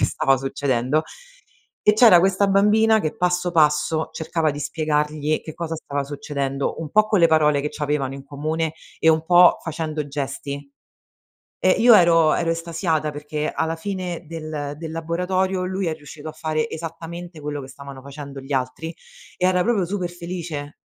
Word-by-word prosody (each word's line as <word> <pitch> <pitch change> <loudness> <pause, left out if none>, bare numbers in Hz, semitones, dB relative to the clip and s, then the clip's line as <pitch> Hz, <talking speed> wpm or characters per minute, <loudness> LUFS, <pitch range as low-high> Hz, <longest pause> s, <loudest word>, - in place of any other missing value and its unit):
che - - +4
stava 135 -1 +2
succedendo. 135 +1 0 0.9
E 210 - +9
c'era 215 -5 +7
questa 195 +2 +2
bambina, 215 +3 +4
che 155 -6 -3
passo, 180 0 0
passo 155 0 +2
cercava 160 -1 -1
di 145 - -6
spiegargli 150 0 -1
che 155 - -9
cosa 165 -1 -4
stava 140 -2 -3
succedendo. 140 0 -3
Un 155 -2 -6
po' 215 0 +5
con 205 -4 +2
le 170 - +6
parole 150 -2 +3
che 150 - -2
c'avevano 145 -3 -2
in 135 0 -9
comune, 155 +3 -2 0.3
e 160 - +3
un 160 0 +4
po' 175 +1 +6
facendo 155 -2 -3
gesti. 140 0 -5 0.9
Ehm, 185 - +4
io, 240 -1 +8
ero 165 -3 +5
ero 170 -1 0
estasiata. 165 -2 -1
Perché 150 +1 -4
alla 160 0 -1
fine 180 -1 -5
del 155 -2 -5
del 160 -1 -6
laboratorio, 180 +3 -1
lui 190 -1 -2
è 160 - 0
riuscito 150 0 -10
a - - -6
fare 155 0 -2
esattamente 165 +1 -7
quello 145 0 -4
che 130 - -9
stavano 135 0 -10
facendo 140 0 -9
gli 135 +2 -6
altri 135 +6 -3 0.4
e 180 - +1
era 180 -1 +3
proprio, 210 -3 +1
super 180 -1 -3
felice. 170 -4 -6
160 Hz, 170 wpm, -22 LUFS, 145-175 Hz, 0.9 s, E